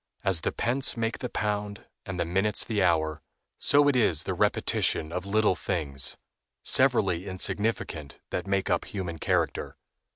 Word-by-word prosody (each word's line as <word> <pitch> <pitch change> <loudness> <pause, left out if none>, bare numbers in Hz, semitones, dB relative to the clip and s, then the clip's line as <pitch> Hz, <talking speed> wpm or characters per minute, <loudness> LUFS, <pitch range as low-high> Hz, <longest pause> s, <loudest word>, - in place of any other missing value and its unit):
As 95 -4 +2
the - - 0
pence 125 +2 +1
make 115 0 -1
the 125 - -4
pound 105 -2 -3 0.2
and 95 -2 -4
the 85 - +1
minutes 95 +4 +2
the 110 -3 0
hour, 80 -3 +1 0.4
so 145 0 +5
it 145 - +3
is 100 - +3
the - - -2
repetition 80 - +1
of 90 +2 -4
little 105 0 +3
things, 70 -9 -2 0.5
severally 100 -9 +2
insignificant, 95 -5 -2
that - - -3
make 95 -1 0
up - - +1
human 90 -5 -5
character. - - -1
95 Hz, 155 wpm, -27 LUFS, 85-110 Hz, 0.5 s, so